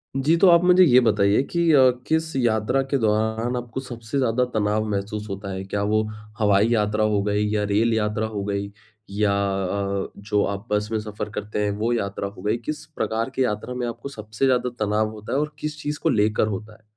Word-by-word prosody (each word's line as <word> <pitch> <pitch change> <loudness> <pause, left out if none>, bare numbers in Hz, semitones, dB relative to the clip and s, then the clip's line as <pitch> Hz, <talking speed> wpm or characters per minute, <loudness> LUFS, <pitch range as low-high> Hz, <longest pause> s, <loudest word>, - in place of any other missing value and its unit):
जी, 145 +5 +3
तो 190 - +5
आप 170 0 +6
मुझे 180 +1 +6
ये 130 -7 +6
बताइए 105 -1 +3
कि 170 - 0
अ, 130 -2 +7 0.2
किस 160 -1 0
यात्रा 120 +1 +1
के 140 - +2
दौरान 110 +2 0
आपको 120 +1 -5
सबसे 120 0 -6
ज़्यादा 125 -1 +2
तनाव 110 0 +1
महसूस 105 +1 -3
होता 100 0 -5
है? 95 - -4
क्या 100 +1 -3
वो 110 +1 +2 0.4
हवाई 105 0 +4
यात्रा 105 -1 +1
हो 105 -2 +2
गई 105 0 0
या 105 - +1
रेल 115 +2 +3
यात्रा 105 0 0
हो 100 - -2
गई, 100 0 -3 0.4
या 100 0 +1
अ, 100 0 -1
जो 100 0 0
आप 100 +4 -8
बस 105 0 0
में 110 - 0
सफ़र 105 0 -6
करते 105 0 -3
हैं, 100 - 0
वो 115 +3 0
यात्रा 100 -3 -2
हो 100 -2 -11
गई? 105 +3 0
किस 150 +6 -6
प्रकार 115 -5 -2
की 130 0 0
यात्रा 105 +2 -2
में 125 -1 -3
आपको 120 +4 -6
सबसे 110 0 -3
ज़्यादा 125 -1 +2 0.2
तनाव 110 +1 0
होता 105 -1 -7
है 135 - +2
और 150 0 -3
किस 150 0 -5
चीज़ 145 0 -3
को 165 - +3
लेकर 105 -2 +2
होता 105 +1 -5
है? 110 - -21
110 Hz, 215 wpm, -23 LUFS, 105-125 Hz, 0.4 s, अ